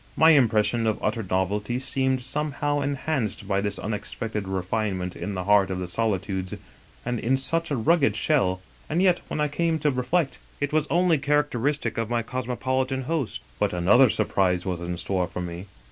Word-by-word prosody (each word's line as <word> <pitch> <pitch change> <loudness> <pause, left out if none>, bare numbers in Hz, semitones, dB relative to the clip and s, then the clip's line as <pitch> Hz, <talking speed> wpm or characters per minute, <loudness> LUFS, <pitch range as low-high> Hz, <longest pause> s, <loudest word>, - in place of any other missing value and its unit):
My 160 +1 +7
impression 115 -4 +3
of 110 - +1
utter 110 +2 0
novelty 100 +4 -1
seemed 130 -1 0
somehow 145 +1 -1
en 140 0 -1
hanced 115 -10 -2
by 100 -1 +1
this 100 -1 -2
unexpected 105 -1 -4
refinement 95 -1 -2
in 105 - -4
the 90 - -2
heart 100 -1 +4
of 95 - -2
the 90 -1 -3
solitudes 95 -1 -1 0.5
and 120 -1 -1
in 130 +3 +1
such 165 +5 +1
a 145 - 0
rugged 145 +5 +3
shell, 95 - +1 0.3
and 160 - 0
yet, 180 -2 +3
when - - -4
I 150 - +2
came 165 +2 0
to 150 -1 +1
reflect, 135 +4 0 0.2
it 145 0 -2
was 155 -1 +2
only 175 -3 +3
characteristic 145 -4 0
of 115 -1 -2
my 120 -1 0
cosmopolitan 130 +2 -2
host. 135 - -2 0.2
But - - +1
another 105 +9 +5
surprise 90 -4 +1
was 90 -2 -2
in 85 0 -3
store 90 0 -1
for 95 - -6
me. 90 +2 -6
120 Hz, 180 wpm, -25 LUFS, 95-145 Hz, 0.5 s, My